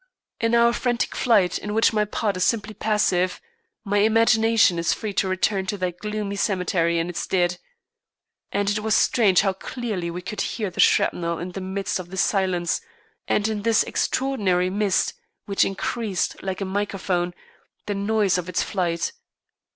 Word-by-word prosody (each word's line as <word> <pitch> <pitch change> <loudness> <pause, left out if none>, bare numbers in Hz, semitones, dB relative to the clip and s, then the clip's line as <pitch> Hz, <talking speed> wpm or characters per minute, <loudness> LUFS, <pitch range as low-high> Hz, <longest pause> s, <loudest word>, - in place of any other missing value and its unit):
In 230 0 +2
our 235 0 +5
frantic 240 0 -1
flight, 205 -8 +2
in 210 0 -5
which 225 0 +4
my 210 -1 +2
part 210 -1 -1
is 185 - 0
simply 215 -2 0
passive, 195 -4 +1 0.4
my 205 -1 +1
imagination 225 -3 +4
is 170 - +1
free 215 -3 -5
to 190 - +1
return 190 +1 0
to 205 - -2
that 180 -2 -3
gloomy 210 -1 -3
cemetery 180 -4 +1
and 165 0 0
its 175 - -4
dead. 180 -1 +1 0.9
And 200 0 0
it 205 +1 +1
was 215 0 +1
strange 200 -7 +4
how 195 -1 +1
clearly 195 -3 -4
we 175 +1 -6
could 200 +2 -4
hear 210 -5 -3
the - - -11
shrapnel 170 -1 +3
in 175 +2 -5
the 195 - -6
midst 190 +1 -2
of 180 -1 -8
this 190 0 -1
silence 180 -4 0 0.5
and 205 - +1
in 215 -2 -2
this 225 +1 +3
extraordinary 195 -9 0
mist, 200 -1 +1 0.3
which 200 -1 +2
increased, 195 0 -2
like 190 0 -4
a - - -1
microphone, 190 -3 -2 0.5
the 205 - -2
noise 200 -2 +1
of 180 0 -6
its 180 - 0
flight. 170 -4 -1
195 Hz, 170 wpm, -23 LUFS, 180-215 Hz, 0.9 s, our